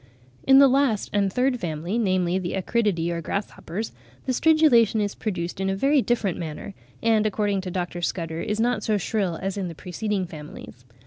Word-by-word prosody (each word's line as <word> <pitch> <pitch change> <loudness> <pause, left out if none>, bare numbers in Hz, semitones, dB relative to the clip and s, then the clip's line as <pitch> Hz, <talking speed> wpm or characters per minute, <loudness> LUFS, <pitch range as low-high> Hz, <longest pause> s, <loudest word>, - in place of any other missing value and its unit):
] 125 0 -30
In 270 - +9
the 275 0 +8
last 265 -5 +1
and 200 -2 +2
third 250 +3 +1
family, 170 +5 -3
namely 185 -3 +1
the 180 -2 -4
Acridiidae 190 -4 0
or 170 0 -3
grasshoppers, 200 +3 -4 0.3
the 260 - 0
stridulation 255 -8 +4
is 205 -1 -1
produced 185 -3 -4
in 190 - 0
a 195 - 0
very 275 +7 +3
different 225 -7 0
manner, 160 +4 -6 0.3
and 220 -2 +3
according 205 -2 0
to 185 - -5
Dr. 175 -1 -3
Scudder, 165 -2 -3
is 210 +1 -2
not 235 -1 +1
so 215 -1 +1
shrill 195 -4 -1
as 195 +1 -3
in 190 - -2
the 165 - -7
preceding 190 +3 -3
Families. 150 -6 -11
195 Hz, 190 wpm, -24 LUFS, 175-225 Hz, 0.3 s, In